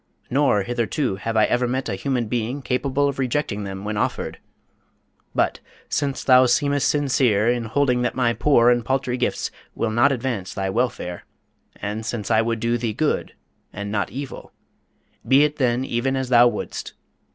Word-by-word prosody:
Nor 130 -7 +3
hitherto 120 0 -1
have 115 +3 -3
I 110 - +5
ever 125 0 +1
met 130 +2 -2
a 105 - -2
human 120 +5 -1
being 120 +4 -3
capable 135 +2 0
of 140 -1 -3
rejecting 125 -6 -1
them 95 0 -6
when 105 0 -3
offered. - - -2 1.0
But, - - +1 0.3
since 140 -2 -1
thou 130 -1 +6
seemest 140 +3 +2
sincere 130 -7 +2
in 120 -1 +1
holding 125 +1 +1
that 120 - -1
my 125 -2 +2
poor 120 -3 +4
and 120 -1 +1
paltry 130 -1 -1
gifts 125 - -1 0.2
will 115 - -1
not 120 +6 +4
advance 120 -7 -3
thy 95 -1 -2
welfare, 110 -6 -2 0.5
and 105 +2 -4
since 110 -1 -4
I 110 0 +5
would 115 0 -1
do 120 +1 0
thee 115 -2 -2
good 150 +7 -1 0.4
and 100 0 -5
not 100 -2 -1
evil 135 +6 -7 0.8
be 135 +2 +6
it 150 -1 -1
even 125 +1 0
as 130 -1 -2
thou 120 -1 +7
wouldst. 110 -3 -4
120 Hz, 170 wpm, -22 LUFS, 110-135 Hz, 1.0 s, thou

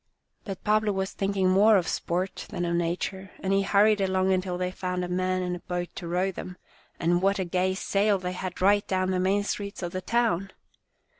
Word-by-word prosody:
But 195 -3 -6
Pablo 215 0 +2
was 190 0 -2
thinking 195 -1 0
more 205 +3 +6
of 180 - 0
sport 180 +3 -2
than 175 -4 -3
of 170 0 0
nature, 180 +3 -2
and 195 0 -1
he 195 - +3
hurried 205 +1 +4
along 190 0 +2
until 185 -1 -1
they 180 0 -2
found 180 -1 -3
a - - -5
man 185 +1 0
and 180 0 -2
a - - -7
boat 175 0 -4
to 170 - -5
row 180 +3 0
them, 180 0 -8 0.4
and 175 +1 +2
what 195 +1 +2
a 190 - -1
gay 185 +1 0
sail 200 +1 +1
they 180 -1 -4
had 180 0 -5
right 205 +1 +4
down 185 0 0
the 185 - 0
main 195 +2 +2
streets 200 -1 -4
of 175 - -3
the 185 - -4
town 220 -4 +1
185 Hz, 215 wpm, -27 LUFS, 180-195 Hz, 0.4 s, more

